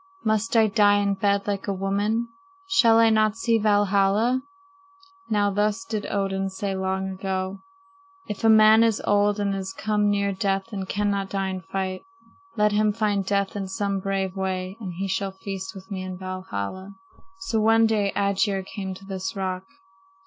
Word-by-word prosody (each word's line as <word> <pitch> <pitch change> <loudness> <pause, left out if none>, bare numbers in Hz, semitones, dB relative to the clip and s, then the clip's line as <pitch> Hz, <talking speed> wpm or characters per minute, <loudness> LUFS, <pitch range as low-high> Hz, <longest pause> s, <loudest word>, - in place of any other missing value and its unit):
Must 220 +1 +1
I 220 - +6
die 205 -1 +4
in 200 -1 +1
bed 200 0 +1
like 200 -1 -3
a 200 - 0
woman? 205 +4 -1 0.4
Shall 235 -13 +5
I 230 -1 +5
not 215 -1 +3
see 230 -1 +2
Valhalla?' 205 +3 +2 0.9
"Now 205 -1 +2
thus 210 +2 0
did 215 -2 -3
Odin 195 -1 -1
say 195 +1 -3
long 190 0 -2
ago: 190 0 -3 0.7
"'If 210 - -6
a 225 - +5
man 220 0 +7
is 225 -2 +2
old 205 0 +2
and 200 -1 0
is 190 -1 -4
come 210 -1 0
near 200 0 +1
death 195 +2 -2
and 190 -2 -4
cannot 200 -1 -1
die 195 -1 -1
in 185 -1 -4
fight, 190 0 -4 0.6
let 210 0 +3
him 210 0 +2
find 205 -2 0
death 200 0 0
in 195 -2 -3
some 200 +1 -2
brave 195 0 -2
way 190 0 -3
and 195 -5 -5
he 195 +3 -3
shall 195 0 -2
feast 190 0 -6
with 190 +1 -12
me 190 -1 -3
in 185 -1 -6
Valhalla.' 185 - -6 0.5
"So 225 -1 0
one 225 +1 +5
day 210 -3 +1
Aegir 200 -1 +1
came 190 -1 -6
to 195 - -13
this 190 0 -4
rock. 185 -1 -3
200 Hz, 175 wpm, -24 LUFS, 190-210 Hz, 0.9 s, man